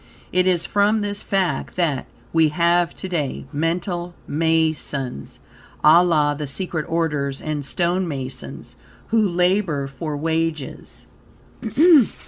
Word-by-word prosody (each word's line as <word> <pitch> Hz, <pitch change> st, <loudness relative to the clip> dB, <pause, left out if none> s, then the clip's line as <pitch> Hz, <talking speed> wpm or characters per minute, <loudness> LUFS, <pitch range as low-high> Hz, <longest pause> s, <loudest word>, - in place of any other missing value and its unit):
It 180 Hz, 0 st, +2 dB
is 175 Hz, -2 st, +2 dB
from 205 Hz, +2 st, +2 dB
this 205 Hz, 0 st, -3 dB
fact, 190 Hz, -3 st, -1 dB
that, 160 Hz, -7 st, 0 dB, 0.3 s
we 160 Hz, -1 st, +4 dB
have 170 Hz, +2 st, +2 dB
to 190 Hz, -, -6 dB
day 155 Hz, -7 st, -3 dB
Mental 175 Hz, +3 st, -2 dB
Masons, 155 Hz, -, -1 dB, 0.5 s
a 165 Hz, +3 st, +7 dB
la 150 Hz, -4 st, +2 dB
the 145 Hz, 0 st, -5 dB
secret 160 Hz, +1 st, -3 dB
orders, 150 Hz, -5 st, -1 dB
and 150 Hz, -2 st, -3 dB
stone 175 Hz, +5 st, 0 dB
masons, 130 Hz, -4 st, -6 dB, 0.3 s
who 225 Hz, -, +3 dB
labor 180 Hz, -4 st, +1 dB
for 145 Hz, +2 st, -5 dB
wages. 160 Hz, -2 st, -3 dB
165 Hz, 115 wpm, -22 LUFS, 150-180 Hz, 0.5 s, a